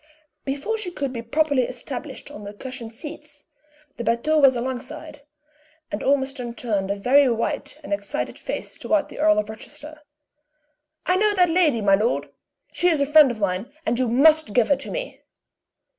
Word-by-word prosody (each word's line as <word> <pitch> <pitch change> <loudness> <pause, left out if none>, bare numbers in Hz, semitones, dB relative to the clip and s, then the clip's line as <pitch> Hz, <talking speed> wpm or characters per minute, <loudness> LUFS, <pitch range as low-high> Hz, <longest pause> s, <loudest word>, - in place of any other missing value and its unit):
Before 285 +12 -2
she 405 -4 -2
could 280 -6 -4
be 235 - -4
properly 285 +3 +1
established - - -7
on 205 - -9
the 205 0 -8
cushioned 250 -1 -7
seats, 300 +1 -10 0.5
the 235 - -4
batteau 235 +7 +2
was 270 -3 +6
alongside, 290 +5 -5 0.7
and 205 - -3
Ormiston 265 -3 0
turned 205 -5 -2
a 200 - 0
very 260 +7 +4
white 230 -1 -2
and 200 - -3
excited 200 0 -3
face - - -5
toward 310 -2 +1
the - - -10
Earl 315 +1 +4
of 210 - 0
Rochester. 295 +8 -10 1.0
"I 365 - +3
know 420 +1 +3
that 360 -2 +4
lady, 320 -9 +3
my 200 -1 +4
lord! 215 +5 +1 0.4
She 355 - +1
is 320 -4 +2
a 280 - +3
friend 295 -1 +7
of 235 -3 -5
mine, 200 +5 -1
and 240 -1 0
you 255 - +2
must 285 0 +4
give 240 -3 +4
her 285 - +5
to 280 - -8
me!" - - -5
270 Hz, 175 wpm, -23 LUFS, 230-310 Hz, 1.0 s, friend